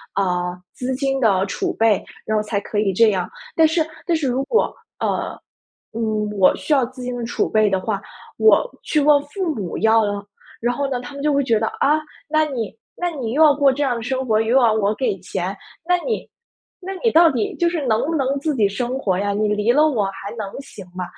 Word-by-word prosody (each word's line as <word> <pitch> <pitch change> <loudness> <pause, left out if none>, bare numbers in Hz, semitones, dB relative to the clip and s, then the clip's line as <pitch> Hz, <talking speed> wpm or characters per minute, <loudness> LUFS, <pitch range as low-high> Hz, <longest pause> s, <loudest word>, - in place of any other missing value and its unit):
呃， 180 -2 -1 0.2
资 255 +1 -3
金 270 0 -1
的 195 -5 +3
储 - - -2
备， 225 -3 +3 0.2
然 215 0 0
后 - - +2
才 210 -1 -3
可 210 - -3
以 195 -3 +1
这 225 +3 +5
样。 185 -3 -1 0.2
但 320 -1 +5
是 320 0 +1 0.2
但 340 -3 +1
是 290 -5 0
如 255 +2 0
果， 450 - +1 0.3
呃， - - -1 0.5
嗯， 215 -2 -1
我 185 - +5
需 - - -7
要 270 -4 +4
资 255 0 -10
金 250 0 -3
的 235 - -3
储 240 - -1
备 215 -1 +3
的 190 - +1
话， 200 -2 -2 0.4
我 - - +3
去 305 - 0
问 290 0 +5
父 335 +2 -3
母 190 -6 -4
要 220 0 +4
了， 205 0 -3 0.4
然 240 +1 +1
后 280 +1 -2
呢， 250 -2 -2
他 280 - -9
们 280 - -7
就 295 0 +2
会 280 0 +2
觉 230 -4 +2
得： 220 - 0
“啊， 300 +2 +4 0.3
那 310 0 +3
你 240 -8 -4 0.2
那 355 0 -1
你 255 -8 -4
又 315 +3 +5
要 300 - +7
过 280 -2 +3
这 290 +2 -1
样 245 -3 0
的 - - -5
生 260 +2 -2
活， 215 -2 +2
又 225 +3 +1
要 235 -4 +5
我 210 -1 +1
给 255 -7 -1
钱， 185 +1 -4 0.3
那 360 0 +3
你 465 - -2 0.5
那 385 +2 -5
你 460 - +5
到 330 0 +6
底 235 -5 -2
就 345 - +1
是 335 -4 -1
能 220 -1 +2
不 330 - -2
能 275 -1 0
自 305 +1 -1
己 210 -4 +3
生 245 +5 -3
活 190 -7 0
呀？ 200 +1 0
你 210 +1 +1
离 210 +3 +2
了 300 +4 +4
我 225 -8 0
还 195 +1 -6
能 210 -2 -3
行 200 -8 -11
吗？ 185 - -3
245 Hz, 250 characters per minute, -21 LUFS, 210-285 Hz, 0.5 s, 要